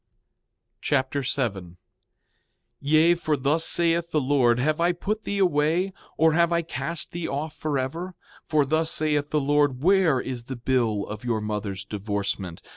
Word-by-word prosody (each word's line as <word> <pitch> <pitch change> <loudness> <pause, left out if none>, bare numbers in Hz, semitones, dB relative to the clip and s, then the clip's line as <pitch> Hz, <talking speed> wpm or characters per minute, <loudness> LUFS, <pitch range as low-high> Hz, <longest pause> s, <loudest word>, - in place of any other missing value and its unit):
2 - - -55
Nephi - - -52
Chapter 140 0 0
7 120 -7 -1
7:1 85 0 -15 1.0
Yea, 155 +4 +4
for 160 -3 -1
thus 145 +5 +1
saith 170 0 +2
the 155 - +1
Lord: 130 -4 +2
Have 155 +6 0
I 175 +1 +3
put 210 +5 -4
thee 200 - -2
away, 175 +1 +1 0.2
or 160 0 +4
have 170 +1 +3
I 170 0 +1
cast 170 +1 -2
thee 175 -1 -4
off 150 +2 -4
forever? 155 +5 -3 0.3
For 150 -2 +2
thus 160 +3 +1
saith 150 -2 +2
the 150 - +1
Lord: 145 -2 +1
Where 180 -7 +4
is 125 -2 -5
the 130 - -6
bill 115 -4 0
of 105 +1 -8
your 120 -3 -1
mother's 105 -2 -4
divorcement? 100 -3 -4
145 Hz, 170 wpm, -25 LUFS, 125-165 Hz, 1.0 s, Yea